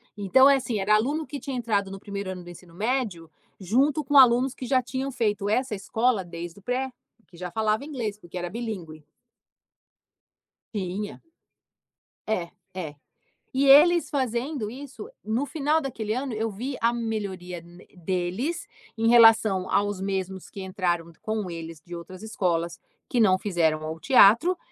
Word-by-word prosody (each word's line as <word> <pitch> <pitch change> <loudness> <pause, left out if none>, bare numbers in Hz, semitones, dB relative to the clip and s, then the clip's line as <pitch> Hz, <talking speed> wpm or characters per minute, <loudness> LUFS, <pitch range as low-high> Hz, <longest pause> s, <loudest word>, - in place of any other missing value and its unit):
Então, 210 +7 +5
é 280 -1 +6
assim: 235 -4 -2
era 200 +2 +2
aluno 285 +9 0
que 285 -2 -6
tinham 270 -3 -5
entrado 205 -5 0
no 195 - -8
1º 200 -1 -5
ano 185 -1 -6
do 175 - -11
ensino 175 -1 -15
médio 210 -7 -2 0.3
junto 270 - +2
com 290 +2 -2
alunos 255 0 +6
que 255 - -7
já 260 +1 +4
tinham 265 +2 -4
feito 210 -5 -1
essa 250 +2 0
escola 220 +2 0
desde 170 +1 -8
o - - -20
pré, 255 +5 -2 0.4
que 175 - -18
já 180 0 -5
falavam 220 - 0
inglês, 220 -8 -4
porque 175 0 -9
era 175 0 -3
bilíngue. 180 -8 -6 1.7
Tinha. 200 +1 -4 1.1
É, 180 -6 -1 0.2
é. 165 -5 -6 0.6
E, 270 +2 +2
eles 320 +4 +7
fazendo 255 -2 -2
isso, 270 - -9 0.2
no 230 +6 -1
final 300 +2 +1
daquele 225 -7 -3
ano, 260 -1 -3
eu 220 +1 -1
vi 245 +7 -5
a 230 - +4
melhoria 205 -6 -4
n 175 +2 -16
deles 185 - -2 0.3
em 225 +1 +1
relação 225 -5 +6
aos 205 -2 0
mesmos 190 -1 -3
que 195 - -8
entraram 175 -3 -2
com 215 -3 -3
eles 165 -1 -7
de 175 +3 -10
outras 180 +3 -10
escolas 175 -6 -1 0.3
que 245 - 0
não 190 -5 +5
fizeram 165 -6 0
ao 160 +1 -5
teatro. 260 - +5
215 Hz, 160 wpm, -26 LUFS, 185-255 Hz, 1.7 s, eles